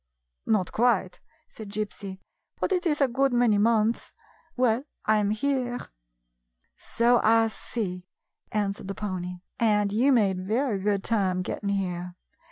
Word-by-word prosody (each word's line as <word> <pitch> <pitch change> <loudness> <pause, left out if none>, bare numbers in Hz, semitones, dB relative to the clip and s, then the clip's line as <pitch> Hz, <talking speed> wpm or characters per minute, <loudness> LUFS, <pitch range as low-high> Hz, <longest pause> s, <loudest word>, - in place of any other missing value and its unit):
" - - -56
Not 210 -5 +1
quite," 220 -6 +1 0.3
said 215 -2 -10
Gypsy; 200 -2 -5 0.2
" - - -43
but - - -1
it 360 -1 +1
is 295 -2 0
a 275 - +5
good 270 +2 +1
many 240 -4 +3
months. 225 +1 +1 0.4
Well, 250 +1 +2 0.2
I 215 0 +4
'm 205 -1 +1
here." 245 +2 0 1.0
"So 235 +1 +2
I 225 +1 +4
see," 185 -5 -5 0.4
answered 200 -2 -2
the 195 - -4
pony, 180 -3 -4 0.2
"and 210 -3 +2
you 250 +6 +3
made 200 -7 +3
very 220 +1 0
good 200 0 0
time 190 -5 +1
getting 200 +2 -4
here. 180 -3 -2
215 Hz, 150 wpm, -26 LUFS, 195-240 Hz, 1.0 s, a